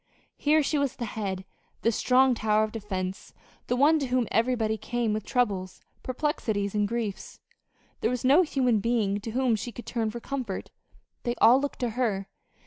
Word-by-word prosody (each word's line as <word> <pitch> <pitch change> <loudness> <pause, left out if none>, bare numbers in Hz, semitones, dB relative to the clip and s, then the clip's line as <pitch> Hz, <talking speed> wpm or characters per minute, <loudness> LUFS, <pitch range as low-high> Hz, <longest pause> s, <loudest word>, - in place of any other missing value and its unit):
Here 305 +1 +3
she 295 +1 0
was 280 -2 0
the 240 - -4
head, 195 -3 -4 0.4
the 230 - +4
strong 255 +3 +4
tower 215 -2 +2
of 215 - -2
defense, 190 -3 -5 0.3
the 245 - +1
one 300 +5 +4
to 275 - -2
whom 250 -2 +1
everybody 225 -1 +1
came 235 0 -1
with 215 -1 -2
troubles, 200 -8 -1 0.2
perplexities, 235 -7 -1
and 210 -1 +1
griefs. 225 -3 -4 0.6
There 225 - +1
was 250 0 -2
no 280 +7 +6
human 255 -9 +2
being 205 -2 +1
to 225 - -6
whom 250 0 +1
she 230 +3 -5
could 240 - -9
turn 225 -3 -1
for 235 - -6
comfort. 245 -6 -5 0.5
They 240 -1 -2
all 250 +3 +6
looked 285 - -3
to 245 - +1
her. 215 -5 -1
235 Hz, 180 wpm, -27 LUFS, 210-255 Hz, 0.6 s, no